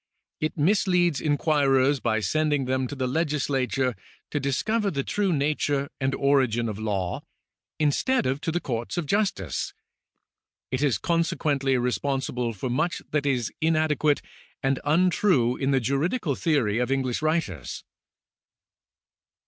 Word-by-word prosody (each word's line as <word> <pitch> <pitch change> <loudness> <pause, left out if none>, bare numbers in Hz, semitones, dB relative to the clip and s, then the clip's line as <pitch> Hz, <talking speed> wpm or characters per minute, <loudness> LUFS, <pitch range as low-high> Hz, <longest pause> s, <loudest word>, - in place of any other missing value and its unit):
It 155 +2 -2
misleads 175 -2 +2
inquirers 145 -3 +2
by 110 -1 0
sending 145 +5 +1
them 130 0 0
to 145 - -6
the 130 -2 -1
legislature 135 -3 0 0.4
to 145 - 0
discover 200 - 0
the 140 -6 -2
true 200 +3 0
nature 145 -2 0
and 135 0 0
origin 130 -5 +2
of 105 -1 -4
law, 100 -5 -2 0.6
instead 155 - +1
of 135 +3 -1
to 165 - -1
the 175 - 0
courts 120 +1 -4
of 175 - -1
justice. 145 - -1 1.0
It 130 +1 -1
is 145 -5 +2
consequently 145 -5 +1
re 125 0 +1
sponsible 130 -3 -1
for 105 +5 -4
much 155 +8 -1
that 145 -1 0
is 125 -5 0
inadequate 155 -2 +2 0.4
and 135 -1 +1
untrue 160 - +3
in 135 - -1
the 135 -1 +3
juridical 145 - 0
theory 130 -8 +1
of 125 +2 0
English 130 -1 0
writers. 155 - -2
140 Hz, 135 wpm, -26 LUFS, 125-155 Hz, 1.0 s, untrue